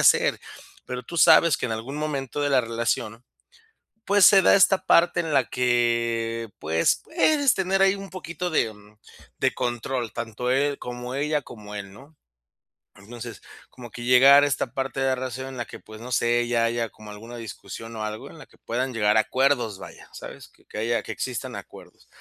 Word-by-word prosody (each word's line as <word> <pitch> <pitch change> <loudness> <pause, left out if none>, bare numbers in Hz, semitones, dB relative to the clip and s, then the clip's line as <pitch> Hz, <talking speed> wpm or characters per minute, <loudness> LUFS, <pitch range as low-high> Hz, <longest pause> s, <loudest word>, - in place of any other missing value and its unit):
hacer, - - +4 0.5
pero 125 0 -5
tú 170 - -8
sabes 165 -2 +6
que, - - -3
en 115 - -3
algún 120 +6 -5
momento 145 -3 -3
de 145 0 0
la 130 -2 +4
relación, 115 0 -3 0.8
pues, 200 -2 +5
se 195 -2 +7
da - - +6
esta 195 -1 +4
parte 175 0 +4
en 165 -2 -3
la 135 -3 +2
que, 115 -2 0
pues, 80 +1 +1
puedes 305 -4 +2
tener 190 0 0
ahí 195 0 +5
un 195 -2 -9
poquito 180 -1 -5
de, 120 -8 +1
mm, 105 +1 -20 0.4
de - - +1
control, 120 -1 -3
tanto 115 +1 -4
él, 140 +2 +1
como 125 +1 -6
ella, 150 +2 0
como 105 -6 -11
él, 100 -1 -7
¿no? 140 +9 -16 0.8
Entonces, 115 +3 -10 0.3
como 120 -2 -11
que 120 +2 -9
llegar 135 +3 +7
a 145 - +3
esta 130 -3 -2
parte 135 0 -3
de 135 - +1
la 130 - +2
relación 130 +1 -5
en 130 - -8
la 120 - -3
que, - - -11
pues, 110 0 -13
no 125 +2 -8
sé, 120 +1 +1
ya 115 -1 +1
haya 115 0 -1
como 105 0 -14
alguna 115 +4 -10
discusión 115 +1 -9
o 110 - -4
algo 110 0 -6
en - - -14
la - - -12
que - - -26
puedan 125 +3 -3
llegar 105 -2 +2
a 110 - +6
acuerdos, 130 -4 0
vaya, - - -12
¿sabes?, - - -10
que - - -28
que - - -10
haya 115 +2 0
que - - -7
existan 125 +1 -5
acuerdos. - - -12
125 Hz, 200 wpm, -24 LUFS, 115-140 Hz, 0.8 s, se